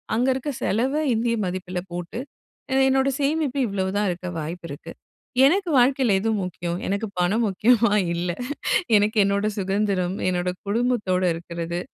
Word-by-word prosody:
அங்க 245 +3 +2
இருக்க 265 +3 -3
செலவை 260 +8 +1
இந்திய 230 +1 +1
மதிப்பில 180 0 -3
போட்டு, 175 +5 -5 0.5
அ - - +1
என்னோட 265 0 +3
சேமிப்பு 285 -1 0
இவ்ளோ 195 -2 -2
தான் 210 - +1
இருக்க 180 +1 -4
வாய்ப்பு 165 +3 -6
இருக்கு. 140 - -8 0.5
எனக்கு 365 +5 +2
வாழ்க்கையில 255 -3 +3
எது 225 +3 -1
முக்கியம்? 175 -1 -4
எனக்கு 200 +3 -1
பணம் 195 +6 +2
முக்கியமா? 225 +3 +3 0.2
இல்ல. 175 +1 -1 0.7
எனக்கு 210 +2 +1
என்னோட 200 +1 +1
சுதந்திரம், 195 -2 0
என்னோட 180 0 0 0.2
குடும்பத்தோட 210 -4 0
இருக்குறது. 170 +1 -5
200 Hz, 140 wpm, -24 LUFS, 180-245 Hz, 0.7 s, என்னோட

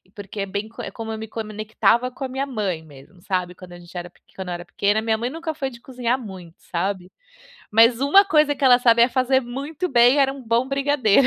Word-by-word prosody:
porque 205 0 -8
é 195 - -1
bem 200 +2 -4
é - - -4
como 225 -1 -6
eu 220 - -4
me 220 0 -7
conectava 220 +3 0
com 260 +2 -9
a - - -1
minha 265 +2 -2
mãe 205 - -3
mesmo, 145 +5 -16
sabe. 180 -2 -2
Quando 180 -1 -12
a 175 - -11
gente 175 +1 -16
era 175 0 -6
peq - - -30
quando 190 -1 -6
eu - - -2
era 175 0 -6
pequena, 205 +4 0
minha 220 -1 0
mãe 240 +2 -2
nunca 325 +1 -5
foi 275 -3 -3
de 235 -2 -14
cozinhar 250 -1 -2
muito, 185 -8 -10
sabe, 185 +1 -4 0.6
mas 230 +2 +5
uma 385 +9 +5
coisa 300 -5 +3
que 285 - -13
ela 250 -2 +7
sabia 235 -1 +5
fazer 260 +1 +2
muito 280 +8 -5
bem 245 +2 +5
era 270 -1 +4
um 270 - -10
bom 235 +3 0
brigadeiro. 275 -4 +3
230 Hz, 235 wpm, -22 LUFS, 195-265 Hz, 0.6 s, ela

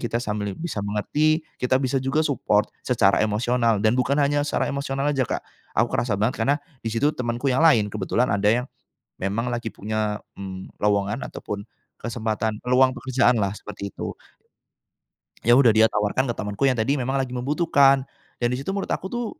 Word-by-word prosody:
kita 120 -1 -2
sambil 105 -3 -3
bisa 160 -10 -4
mengerti, 150 +11 0 0.2
kita 125 +1 +2
bisa 130 0 0
juga 135 +4 0
support 105 -7 +1
secara 110 -6 +3
emosional 115 +1 +1
dan 110 - +5
bukan 130 +2 +1
hanya 145 0 +2
secara - - 0
emosional 140 0 -2
aja, 135 -3 0
Kak. - - -3 0.3
Aku - - +2
kerasa 115 -4 0
banget 110 +4 -1
karena 140 +6 +3 0.2
di 115 - -4
situ 115 +7 +1
temanku 125 +1 -1
yang 130 - +1
lain, 115 -11 +4
kebetulan 110 +5 0
ada 100 +1 +2
yang 120 +3 +2 0.5
memang 105 +6 -2
lagi 120 -2 -4
punya, 105 0 -2 0.2
mmm, 95 -1 -7
lowongan 105 +3 0
ataupun 100 0 -6 0.3
kesempatan 110 -2 -3
peluang 130 +1 +3
pekerjaanlah, 125 -5 +2
seperti 100 0 -7
itu. - - -6 1.3
Ya, 120 +2 +5
udah. 125 -5 +6
Dia 110 0 +5
tawarkan 105 +5 0
ke - - -2
temenku 105 +3 -5
yang 130 - +1
tadi 110 +6 +2
memang 135 -1 -1
lagi 130 -2 -2
membutuhkan 140 0 +3 0.3
dan 120 - +1
di 125 - 0
situ 140 - -4
menurut 195 0 -3
aku, - - -3
tuh, 240 -1 -2
120 Hz, 175 wpm, -24 LUFS, 105-135 Hz, 1.3 s, udah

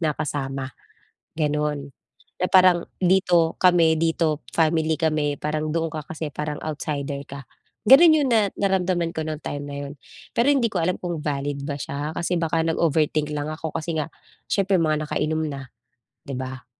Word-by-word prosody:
na 155 -3 +1
kasama, 135 -3 -3 0.7
gano'n. 150 -2 -1 0.5
Eh, 180 - +1
parang, 185 -2 +5 0.2
dito 175 -3 +3
kami, 170 -3 +4
dito 160 -2 0
family, 160 -1 +2
kami 155 -3 0
parang 155 0 -2
doon 165 -1 -1
ka 155 -1 -6
kasi 160 -1 -5
parang 150 +1 -4
outsider 145 -2 -3
ka. 140 0 -8 0.5
Ganun 320 +8 +9
'yun 295 -3 +2
na 215 -3 +3
naramdaman 185 -3 +1
ko 160 - -2
nung 155 -1 -4
time 145 0 -4
na 140 - -6
'yun, 140 - -7 0.4
pero 235 +3 +3
hindi 265 -5 +3
ko 185 - -1
alam 180 +2 +1
kung 175 -3 -3
valid 140 -1 -2
ba 145 - -2
siya, 145 +2 -4
kasi 175 +1 -1
baka 165 0 0
nag-overthink 155 -2 +1
lang 145 0 -3
ako, 160 0 -5
kasi 165 +1 -3
nga 150 - -2 0.4
siyempre 195 -1 +2
mga 155 -2 0
nakainom 155 +1 -1
na, 135 -3 -7 0.6
'di'ba. 130 -1 -5
155 Hz, 165 wpm, -23 LUFS, 145-170 Hz, 0.7 s, Ganun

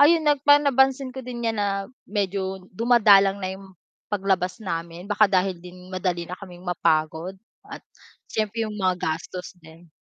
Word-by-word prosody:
Ayun 315 +2 +6
nag 290 -2 +3
pan 290 0 +8
na 280 - +3
pansin 265 0 +3
ko 265 - -6
din 240 -1 -6
'yan 225 - -2
na 195 -1 -1 0.2
medyo 190 -2 -2
dumadalang 200 -3 +5
na 185 0 -2
'yung 195 -1 -14 0.4
paglabas 190 0 0
namin, 170 -1 -5
baka 210 +1 +5
dahil 185 -1 +1
din 180 0 -12
madali 175 -2 -1
na 180 - -5
kaming 180 -3 -11
mapagod 165 +1 0 0.3
at - - -8 0.5
siyempre 220 +1 -1
'yung 210 - -7
mga 185 -2 +1
gastos 175 +3 -4
din. 165 +1 -16
195 Hz, 170 wpm, -24 LUFS, 180-220 Hz, 0.5 s, pan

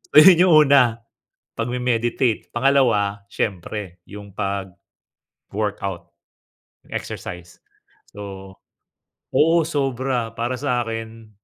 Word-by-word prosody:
Ayun 170 +2 +9
'yong 175 - +5
una, 125 -5 +4 0.6
pagme-meditate. 120 -1 -1
Pangalawa 120 -6 +2
siyempre 95 -2 -4
'yong 100 -1 -10 0.9
pag-workout, 100 -4 -5 0.9
exercise. 90 0 -7 0.6
So, 95 -1 -9 0.8
oo, 165 +2 +4
sobra 130 -6 -2
para 120 +2 -2
sa 125 -3 0
akin, 115 -1 -7
115 Hz, 80 wpm, -22 LUFS, 100-130 Hz, 0.9 s, Ayun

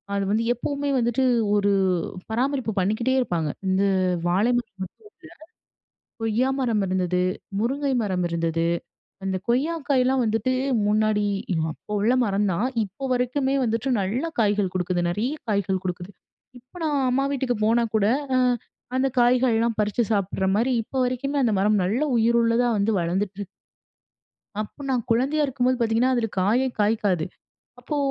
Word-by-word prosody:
அது 200 - 0
வந்து 220 +2 +1
எப்பவுமே 285 +3 -3
வந்துட்டு 240 +2 +1 0.3
ஒரு 205 0 +2 0.6
பராமரிப்பு 260 0 0
பண்ணிக்கிட்டே 220 +7 +1
இருப்பாங்க. 170 -10 -1 0.2
இந்த, 190 +1 +2 0.4
வாழை 200 +8 +2
மரம் 240 -5 -5
மட்டும் 185 - -10 1.0
இல்ல, - - -77 0.2
கொய்யா 225 +4 +1
மரம் 230 -5 +1
இருந்தது, 180 -1 0 0.4
முருங்கை 275 +4 0
மரம் 185 -3 -1
இருந்தது. 165 0 0 0.6
அந்த 190 -1 -1
கொய்யா 275 +8 +1
காய்லாம் 260 -1 +3
வந்துட்டு, 225 +4 0 0.3
முன்னாடி 215 0 +2 0.5
அப்போ 210 - -11
உள்ள 225 +5 +3
மரம் 205 -1 +1
தான். 205 +8 0 0.2
இப்போ 200 +7 -9
வரைக்குமே 260 +2 0
வந்துட்டு 230 +2 -1
நல்ல 210 - -1 0.2
காய்கள் 205 -3 +1
கொடுக்குது. 180 -1 0
நிறைய 220 +10 -1 0.2
காய்கள் 195 -2 0
கொடுக்குது. 180 +1 -4 0.5
இப்ப, 250 +5 -26
நான் 295 -2 +1
அம்மா 270 +2 +1
வீட்டுக்கு 255 -4 -1
போனா 235 +1 +3
கூட, 205 -1 +2 0.3
அ - - +4 0.6
அந்த 260 +1 +2
காய்கள்லாம் 240 -2 +2
பறிச்சு 210 +3 +1
சாப்பிடுற 195 -1 0
மாதிரி 240 +4 +1
இப்ப 225 - -20
வரைக்குமே, 255 +3 -2
அந்த 230 - +2
மரம் 210 +1 +3
நல்ல 220 +10 0 0.2
உயிருள்ளதா 235 +1 +3
வந்து 205 +2 +1
வளர்ந்துட்டு 185 +4 -2
இருக் 200 - -5 1.1
அப்ப 215 +7 -8
நான் 250 -4 0
குழந்தையா 270 +7 +2
இருக்கும்போது 255 -1 0
பார்த்தீங்கன்னா, 235 +2 +2
அதில 230 -2 0
காயே 225 +8 +2
காய்க்காது. 205 -6 +1 0.5
அப்போ 285 +5 -4
225 Hz, 145 wpm, -24 LUFS, 200-255 Hz, 1.1 s, அ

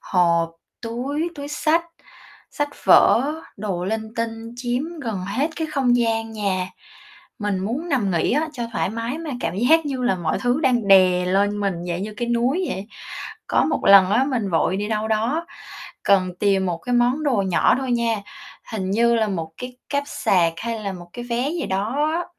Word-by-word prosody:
hộp, 170 -2 +2 0.3
túi, 275 +8 -3
túi 285 -2 -7
xách, 320 +3 +1 0.7
sách 290 0 -2 0.2
vở, 275 +5 +5 0.2
đồ 195 -4 -3
linh 220 +2 -3
tinh 230 0 -4
chiếm 245 +1 -1 0.2
gần 220 -6 -3
hết 260 - -1
cái 320 - -2
không 265 -5 +2
gian 225 -1 0
nhà. 195 -4 -1 0.7
Mình 205 -2 -1
muốn 240 - -3
nằm 240 - +1
nghỉ 170 -3 +1
á, 305 +4 +1
cho 250 -5 -5
thoải 205 - -1
mái 230 +6 -4
mà 330 -2 -5
cảm 165 - -2
giác 310 +9 +4
như 265 -3 -3
là 245 -5 +2
mọi 170 -3 -1
thứ 245 +4 +1
đang 245 -7 +1
đè 185 -2 +6
lên 200 +2 +1
mình, 200 -2 0
dạng 175 +1 -2
như 210 +1 -6
cái 240 -1 -3
núi 245 +10 +1
vậy. 190 +2 -4 0.6
Có - - +2
một - - 0
lần 195 -1 +8
á, 235 +6 +3
mình 245 -8 -1
vội 175 +2 +1
đi 205 +1 -2
đâu 220 0 -1
đó, 235 +10 0 0.6
cần 190 -2 +3
tìm 195 -2 +2
một 175 -2 -2
cái 245 - -5
món 245 +5 +2
đồ 275 -5 +2
nhỏ 185 +3 +3
thôi 260 -2 -2
nha, 230 -3 0 0.5
hình 190 -4 -2
như 235 +3 +3
là 220 -2 +1
1 165 -5 -3
cái 250 0 -7
cáp 285 0 0
sạc 175 -10 +2
hay 230 +3 -4
là 200 -2 -3
1 175 -2 -10
cái 240 - -7
vé 245 +3 -1
gì 340 +1 -3
đó 230 +11 0
á, 350 +1 -1
225 Hz, 195 wpm, -22 LUFS, 195-255 Hz, 0.7 s, lần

